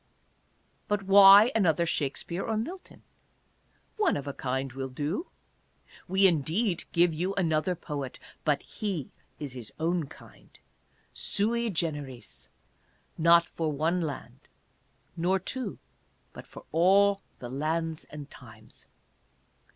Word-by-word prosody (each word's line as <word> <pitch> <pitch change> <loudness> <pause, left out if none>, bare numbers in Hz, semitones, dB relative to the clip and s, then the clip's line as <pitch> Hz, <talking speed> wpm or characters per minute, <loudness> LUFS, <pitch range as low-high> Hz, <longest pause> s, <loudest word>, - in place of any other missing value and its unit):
But 205 -1 0
why 200 +3 +8
another 170 -6 +2
Shakspere 165 +4 -3
or 220 -1 -1
Mil 340 - -4
ton? - - -19 0.9
One 420 -4 +2
of 140 - -6
a 140 - -4
kind 130 0 -3
will 135 0 -4
do. 150 - -3 0.8
We 190 +2 +3
indeed 175 - +1
give 170 -1 +3
you 180 +5 -2
anothei 165 -1 0
poet, 140 -4 -5 0.3
but 145 -3 +1
he 195 - -4 0.3
is 145 -4 -5
his 120 -4 -9
own 165 -1 0
kind - - -17 0.3
— - - -38 0.2
sui 235 +3 0
generis 145 - -4 0.4
— - - -39
not 170 0 +7
for 160 -2 -2
one 160 +5 0
land, 150 -4 -6 0.8
nor 180 +3 +1
two, 255 +7 -4 0.6
but - - -11
for - - -12
all 195 +4 +4 0.2
the 120 - -8
lands 160 +4 -2
and 145 -2 -9
times. 110 -4 -14
170 Hz, 130 wpm, -28 LUFS, 145-195 Hz, 0.9 s, why